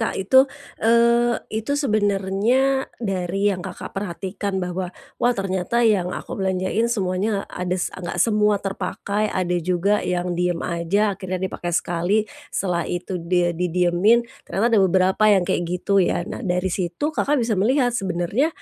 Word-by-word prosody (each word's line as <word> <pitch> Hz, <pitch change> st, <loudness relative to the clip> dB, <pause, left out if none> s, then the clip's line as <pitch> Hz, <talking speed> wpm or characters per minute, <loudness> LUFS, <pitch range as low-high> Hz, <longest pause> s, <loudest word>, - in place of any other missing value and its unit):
Kak, 225 Hz, -, -1 dB
itu, 260 Hz, +8 st, +4 dB, 0.3 s
eee, 235 Hz, +1 st, +4 dB, 0.2 s
itu 220 Hz, +7 st, -1 dB
sebenarnya, 215 Hz, +3 st, +1 dB
dari 195 Hz, -1 st, -1 dB
yang 180 Hz, -, -5 dB
Kakak 185 Hz, 0 st, -7 dB
perhatikan 195 Hz, +1 st, -4 dB
bahwa, 180 Hz, 0 st, -3 dB, 0.3 s
"Wah, 245 Hz, +1 st, +4 dB
ternyata 195 Hz, +4 st, 0 dB
yang 195 Hz, -5 st, +3 dB
aku -, -, -6 dB
belanjain 190 Hz, +4 st, 0 dB
semuanya 200 Hz, -1 st, -1 dB
ada 180 Hz, 0 st, -3 dB
s 180 Hz, -, -2 dB
enggak 180 Hz, -2 st, -6 dB
semua 210 Hz, -2 st, +3 dB
terpakai, 200 Hz, +2 st, -2 dB
ada 180 Hz, -1 st, -1 dB
juga 185 Hz, +4 st, +1 dB
yang 180 Hz, 0 st, -1 dB
diem 175 Hz, 0 st, 0 dB
aja 185 Hz, +5 st, 0 dB
akhirnya 185 Hz, -1 st, -4 dB
dipakai 175 Hz, -2 st, -2 dB
sekali, 175 Hz, +5 st, 0 dB, 0.3 s
setelah 175 Hz, -3 st, -1 dB
itu 180 Hz, 0 st, -3 dB
dia 175 Hz, 0 st, +1 dB
didiemin. 180 Hz, +6 st, +2 dB, 0.2 s
Ternyata 230 Hz, +4 st, +1 dB
ada 220 Hz, -, +5 dB
beberapa 190 Hz, +2 st, +3 dB
yang 195 Hz, -3 st, +4 dB
kayak 175 Hz, -, 0 dB
gitu 185 Hz, +2 st, +1 dB
ya." 175 Hz, -1 st, +1 dB
Nah, -, -, -6 dB
dari 180 Hz, -3 st, -1 dB
situ 185 Hz, -, -2 dB
Kakak 295 Hz, 0 st, +1 dB
bisa 235 Hz, -2 st, 0 dB
melihat 250 Hz, +2 st, +2 dB
sebenarnya 195 Hz, -, 0 dB
195 Hz, 150 wpm, -22 LUFS, 180-220 Hz, 0.3 s, ada